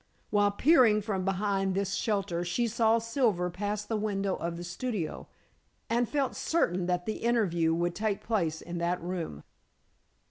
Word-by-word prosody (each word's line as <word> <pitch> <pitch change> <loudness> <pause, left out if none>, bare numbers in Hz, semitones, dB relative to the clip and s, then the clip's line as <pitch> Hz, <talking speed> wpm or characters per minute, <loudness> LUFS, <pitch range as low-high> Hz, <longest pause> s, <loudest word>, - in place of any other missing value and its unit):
While 205 -1 +4
peering 225 -2 +4
from 195 -3 -2
behind 195 0 0
this 195 0 -1
shelter, 195 -5 -1
she 235 +7 0
saw 225 0 +3
Silver 225 -6 0
pass 205 +3 -3
the 220 - -2
window 200 -2 -1
of 170 0 -4
the 175 - -6
studio, 175 0 -4 0.6
and 235 0 +2
felt 280 -3 0
certain 185 - 0
that 180 -1 0
the 215 - -2
interview, 195 -9 +1
would 175 +1 0
take 210 0 -2
place 170 -8 -1
in 175 0 -5
that 175 +1 0
room. 170 - -5
200 Hz, 155 wpm, -29 LUFS, 175-220 Hz, 0.6 s, While